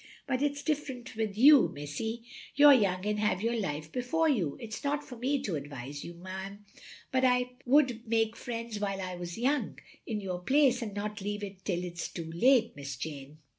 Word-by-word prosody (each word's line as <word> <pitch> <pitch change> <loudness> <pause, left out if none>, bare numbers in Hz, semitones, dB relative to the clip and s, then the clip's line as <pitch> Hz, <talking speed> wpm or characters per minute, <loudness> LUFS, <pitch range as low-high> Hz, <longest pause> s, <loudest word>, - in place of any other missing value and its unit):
But 260 -2 -1
it 285 0 +1
's 285 - -7
different 265 -6 -3
with 215 -2 -2
you, 280 +3 +8
missie; 145 +12 -5 0.3
you 290 +1 +8
're - - +10
young, 195 -6 +2
and 210 0 0
have 210 -2 +1
your 235 +1 +1
life 155 -7 -3
before 290 +7 +1
you. 190 - +1
It 220 -2 -8
's - - -6
not 290 +1 0
for 250 - -10
me 265 +4 0
to 190 -9 -2
advise 140 -1 -6
you, 170 0 -9
'm, 195 +2 -7 0.5
but 260 0 +2
I 250 -1 +3 0.2
wotild 255 -4 +3
make 225 0 +1
friends 230 -3 -5
while 195 -1 -2
I 185 -1 -4
was 175 +1 -6
young, 275 +5 0 0.3
in 220 -3 -2
your 185 -3 -4
place, 260 +5 +3
and 210 -3 -5
not 210 0 -4
leave 205 +1 -3 0.2
till 180 -3 -1
it 175 -1 -7
's - - -2
too 165 -2 -7
late, 235 +6 +4
Miss 140 -1 -6
Jane. 145 +1 -7
215 Hz, 210 wpm, -30 LUFS, 180-255 Hz, 0.5 s, re